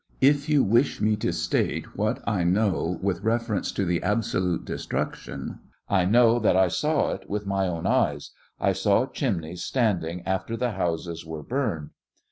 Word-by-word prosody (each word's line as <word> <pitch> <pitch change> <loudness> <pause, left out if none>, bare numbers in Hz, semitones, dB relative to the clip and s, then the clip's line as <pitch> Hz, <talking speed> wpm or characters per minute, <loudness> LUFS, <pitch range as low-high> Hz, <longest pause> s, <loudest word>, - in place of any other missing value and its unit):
If 145 +2 +3
you 150 -3 +4
wish 120 +7 +2
me 105 0 +2
to - - -1
state - - -1
what - - -1
I 100 -4 +1
know 90 -1 +1
with 95 -1 0
refer 115 0 0
ence - - -2
to 100 - -1
the 85 -1 0
absolute 95 -5 0
destruction, - - -4 0.3
I 95 -2 +3
know 115 +3 +5
that 105 -5 +3
I 95 -1 +4
saw 150 - +1
it - - -7
with 105 0 -2
my 95 -1 0
own 85 -2 -3
eyes; - - +1 0.3
I 100 - +2
saw 100 +5 +2
chimneys 90 - -3
standing 90 -8 0
after 95 +4 -2
the 120 0 0
houses 85 -3 -2
were 80 -2 -7
burned. 110 - -2
100 Hz, 170 wpm, -26 LUFS, 90-115 Hz, 0.3 s, know